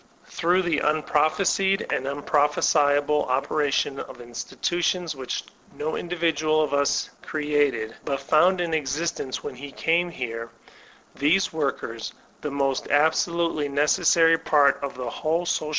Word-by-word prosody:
Through 180 +3 +1
the 170 -4 +1
unprophesied 155 +6 +1
and 135 - -2
unprophesiable 145 0 +2
opera 145 +3 0
tion 135 0 0
of 125 - -8
institutions 165 +8 -2
which 130 -2 -4 0.3
no 155 +2 -3
individual 160 -3 0
of 150 - -3
us 140 0 +1
created, 145 -7 -1
but 140 -1 -2
found 175 +6 +3
in 170 -2 -2
existence 150 -2 -2
when - - -5
he 140 +3 -9
came 170 +4 +1
here, 115 -6 -5 0.6
these 165 +7 +2
workers, 135 -7 -3 0.3
the 150 - -3
most 135 -1 -1
absolutely 160 +1 +1
necessary 165 +3 +3
part 145 -2 +3
of 140 -2 -4
the 125 -1 -5
whole 160 +8 -1
soda! 155 -3 -1
150 Hz, 130 wpm, -24 LUFS, 140-165 Hz, 0.6 s, found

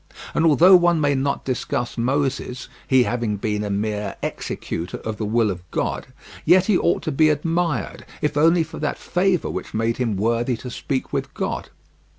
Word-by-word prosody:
And 165 - +3
although 175 +5 +7
one 175 -2 +4
may 145 -2 +2
not 140 +1 -1
discuss 125 -1 -2
Moses, 130 0 -1 0.2
he 130 -1 +5
having 120 -4 -1
been 105 +1 -2
a 105 - -3
mere 105 0 -2
executor 85 +2 -4
of 110 -1 -5
the 105 - -3
will 110 -1 +2
of 90 -2 -6
God, - - -2 0.4
yet 185 +1 +5
he 210 - +3
ought 175 - +1
to - - -2
be 155 +3 +4
admired, 165 -1 -1 0.2
if 150 -1 -1
only 165 +3 +4
for 160 - -9
that 150 - -2
favour 180 -1 0
which - - -6
made 115 +1 0
him 115 -6 -1
worthy 115 +3 0
to 125 - -8
speak 130 +3 -3
with 135 -1 -2
God. - - -3
130 Hz, 180 wpm, -22 LUFS, 115-155 Hz, 0.4 s, although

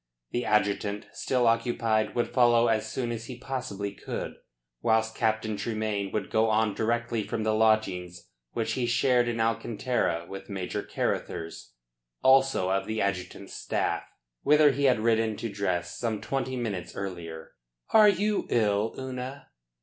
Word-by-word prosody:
The 120 - -1
adjutant, 105 0 +1
still 125 -2 0
occupied, 115 -2 +1
would 120 - +1
follow 120 -2 +5
as 110 -1 0
soon 120 -2 -2
as 115 -1 -5
he 125 - -7
possibly 125 -6 -4
could, - - -5 0.5
whilst 110 0 +2
Captain 110 -2 0
Tremayne 110 -3 -2
would 105 -3 -3
go 110 0 +3
on 110 -1 +2
directly 115 +2 0
from 110 +1 -3
the 110 0 +1
lodgings 95 -5 +1 0.3
which 115 0 -1
he 120 +1 0
shared 120 0 +3
in 115 -1 -2
Alcantara 115 -5 0
with 95 - -8
Major 95 -2 -3
Carruthers 80 -6 -3 0.5
also 135 -8 +4
of 95 0 0
the 110 0 -2
adjutant's 100 -2 -3
staff - - -1 0.4
whither 150 0 +6
he 140 +1 0
had 130 -4 +4
ridden 110 -1 +2
to 115 - -3
dress 90 -3 -2
some 115 -3 -1
twenty 130 +1 -2
minutes 110 -8 -4
earlier. 85 -4 -6 0.4
"Are 215 -1 +8
you 205 +1 0
ill, 105 -1 +1
Una?" 130 +1 -6
110 Hz, 150 wpm, -28 LUFS, 100-120 Hz, 0.5 s, Are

